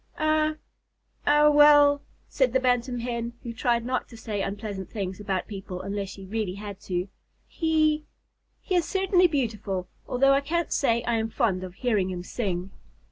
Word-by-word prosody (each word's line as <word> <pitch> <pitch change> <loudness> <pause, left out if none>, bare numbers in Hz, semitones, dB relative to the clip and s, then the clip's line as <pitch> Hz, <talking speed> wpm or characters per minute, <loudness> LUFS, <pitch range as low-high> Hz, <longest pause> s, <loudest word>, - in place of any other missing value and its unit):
"Er 310 0 +2 0.7
er 295 +1 +6
well," 290 -1 +7 0.3
said 260 -3 +1
the 260 - +4
Bantam 245 -1 0
Hen, 235 -1 -3
who 235 - -5
tried 235 0 0
not 255 +1 -2
to 230 - -12
say 215 -2 -3
unpleasant 200 -1 -4
things 190 -3 -4
about 195 -3 -2
people 195 -3 -6
unless 200 -1 -3
she 195 0 -10
really 205 -2 -3
had 200 -1 -7
to, 180 -2 -3 0.4
"he 310 -2 +1 0.6
he 380 - -4
is 350 -3 +3
certainly 375 0 +3
beautiful, 215 - -2 0.2
although 275 +2 +4
I 275 - +3
can't 340 +4 -1
say 235 -5 +2
that 235 - -11
I 230 - +2
am 220 0 -1
fond 210 -6 0
of 185 -1 -8
hearing 210 -7 0
him 180 -1 -5
sing." 190 -3 -3
235 Hz, 175 wpm, -26 LUFS, 195-290 Hz, 0.7 s, well